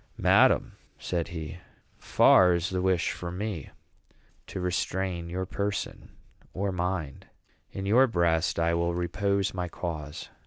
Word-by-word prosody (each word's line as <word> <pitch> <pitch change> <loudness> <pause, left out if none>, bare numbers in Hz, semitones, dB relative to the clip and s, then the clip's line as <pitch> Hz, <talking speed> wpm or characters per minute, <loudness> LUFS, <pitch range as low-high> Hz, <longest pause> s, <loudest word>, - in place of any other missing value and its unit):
"Madam," - - +4 0.3
said 85 -2 -2
he, 80 0 -7 0.4
"far 90 -1 +5
is 90 +3 -2
the 90 -1 -1
wish 95 -2 +1
from 90 0 -6
me 100 -7 -4 0.8
to - - -6
restrain 90 -1 -2
your 95 +2 -3
person 100 +2 -4 0.5
or 100 +1 -1
mind. 90 -5 -3 0.4
In 95 - -5
your 120 +7 +5
breast 85 -5 +1
I 85 0 +2
will 85 0 0
repose 100 +3 0
my 90 -1 -3
cause. 80 -3 -6
90 Hz, 130 wpm, -28 LUFS, 85-95 Hz, 0.8 s, far